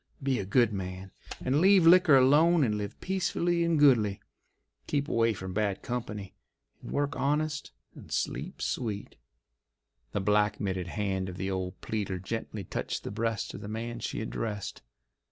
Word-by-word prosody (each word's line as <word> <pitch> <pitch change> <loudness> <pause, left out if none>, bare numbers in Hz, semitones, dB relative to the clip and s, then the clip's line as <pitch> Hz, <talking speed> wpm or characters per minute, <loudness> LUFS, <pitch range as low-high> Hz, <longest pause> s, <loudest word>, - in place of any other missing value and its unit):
Be 135 -2 +1
a 100 - -3
good 110 +2 +3
man, 95 0 -5 0.3
and 135 +4 +2
leave 190 -2 +6
liquor 170 -3 +7
alone 150 +5 +5
and 110 -4 +1
live 105 -1 -5
peaceably 175 -2 0
and 170 -1 +2
goodly. 115 -9 +4 0.7
Keep 140 -1 0
away 115 -5 +2
from 95 -1 -6
bad 100 -1 -1
company 110 -5 -4 0.5
and - - -9
work 145 0 0
honest 150 +3 -1 0.2
and - - -13
sleep - - -3
sweet." 105 -4 -3 1.0
The - - -1
black 105 +1 +2
mitted 95 -3 -2
hand 95 0 -2
of 90 - -8
the 95 0 -2
old 95 0 -3
pleader 100 -4 -2
gently 105 +2 -5
touched - - -4
the - - -5
breast 115 0 -2
of - - -8
the - - -7
man 115 +2 -4
she - - -3
addressed. 110 -2 -4
110 Hz, 160 wpm, -29 LUFS, 100-140 Hz, 1.0 s, liquor